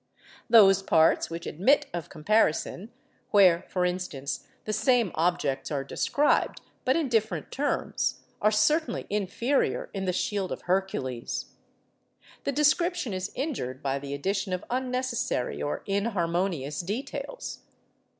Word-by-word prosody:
Those 195 -4 +7
parts 160 -4 +3
which 165 0 -6
admit 270 - +3
of 170 -3 -4
comparison—where, 200 +1 +1
for 180 -1 0
instance, 180 -6 -3 0.2
the 215 - -2
same 240 -5 +3
objects 155 -5 0
are 140 -2 -2
described, 285 - +1 0.3
but 260 - +3
in 325 -4 +1
different 225 -3 0
terms—are 275 -6 -1
certainly 240 +6 +1
inferior 210 +7 0
in 195 -2 -3
the 185 - +1
'Shield 195 +1 -1
of - - -5
Hercules.' 175 -10 -2 0.9
The - - +1
description 300 - +2
is 185 +1 -3
injured 235 - -3
by 135 0 0
the 140 0 -5
addition 190 +5 -1
of 180 - -3
unnecessary 255 - -1
or 145 - -3
inharmonious 175 - -1
details. 235 - -5
195 Hz, 120 wpm, -27 LUFS, 170-245 Hz, 0.9 s, Those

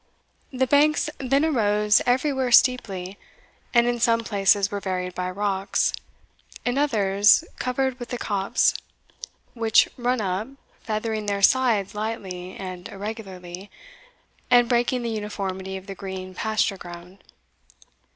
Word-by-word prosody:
The 260 -1 +1
banks 300 +3 +3
then 275 +3 +2
arose 210 -7 +3
everywhere 260 0 +1
steeply, 200 -7 +2 0.5
and 235 -1 +4
in 240 0 0
some 230 0 +3
places 200 -2 +2
were 205 - -2
varied 180 -2 -3
by 180 0 -3
rocks 195 0 0 0.7
in 245 +3 0
others 210 -4 +4 0.2
covered 255 0 -1
with 240 - -7
the 245 - -3
copse, 205 +1 +1 0.8
which 225 -2 +4
run 250 0 0
up, 195 +1 -2 0.3
feathering 215 -1 -3
their 200 -1 -1
sides 230 -5 +3
lightly 195 -4 -5
and 185 -1 -7
irregularly, 195 -3 -8 0.8
and 245 -1 +5
breaking 245 0 +1
the 235 - -2
uniformity 190 -3 -4
of 190 - -11
the 195 - -7
green 190 -1 -7
pasture 215 0 0
ground. 175 +2 -11
210 Hz, 125 wpm, -24 LUFS, 190-245 Hz, 0.8 s, and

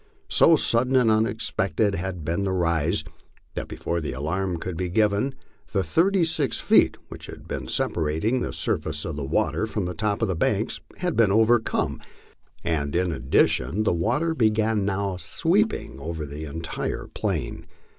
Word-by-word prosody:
So - - +6
sudden 125 +3 +2
and 125 -4 +5
unexpected 110 -3 +1
had 90 -3 -4
been 85 +5 -1
the 95 - 0
rise, 85 -3 +1 0.5
that - - -4
before 85 0 -3
the 75 - -3
alarm 85 +7 -2
could 90 +1 -5
be 90 +1 -2
given 105 +6 +1 0.4
the 100 -2 +2
thirty 175 - +3
six 150 -7 0
feet - - +4
which - - -9
had - - -10 0.2
separated 85 +11 0
the - - -2
surface 75 -1 -2
of 80 - -4
the 75 - -4
water 105 +9 0
from 105 -3 -2
the 90 - -3
top 105 +2 -1
of - - +2
the 95 - -1
banks - - 0 0.2
had 180 -3 -1
been 110 -4 +4
overcome, 110 +2 +2 0.6
and 75 -3 -1
in 90 0 +1
addition 80 - +2
the 105 - +2
water 150 - +1
began 110 -5 +2
now 100 -1 -1
sweeping 165 - +1
over 80 +1 -4
the 75 +2 -6
entire 80 +2 -4
plain. - - -3
95 Hz, 160 wpm, -25 LUFS, 80-110 Hz, 0.6 s, So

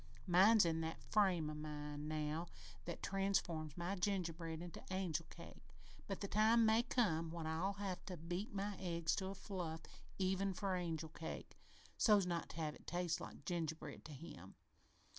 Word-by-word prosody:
Mine's 195 +4 +7
in 165 -1 +1
that 160 0 -4
frame 190 -7 +4
of 150 0 -4
mind 150 0 -4
now 155 +2 -1 0.4
that 170 - -5
transforms 180 -6 0
my 175 +2 -1
gingerbread 170 -4 -1
into 175 0 -7
angel 180 -4 -1
cake, - - -12 0.4
but 195 - -3
the 200 - -1
time 220 +3 +5
may 220 +1 +6
come 165 -10 +2
when 165 -1 -4
I'll 165 +5 0
have 195 -2 -3
to 180 -3 -4
beat 175 +6 -3
my 200 0 -2
eggs 170 -3 +1
to 190 - -1
a 195 - -4
fluff 175 -5 -4 0.4
even 190 0 +1
for 195 -1 0
angel 165 -3 -2
cake, 160 +1 -6 0.4
so's 210 -4 +6
not 170 -2 -1
to - - -9
have 155 -2 -1
it - - -16
taste 175 -1 0
like - - -8
gingerbread 160 -4 -3
to 155 - -8
him. 115 - -9
175 Hz, 170 wpm, -40 LUFS, 160-195 Hz, 0.4 s, Mine's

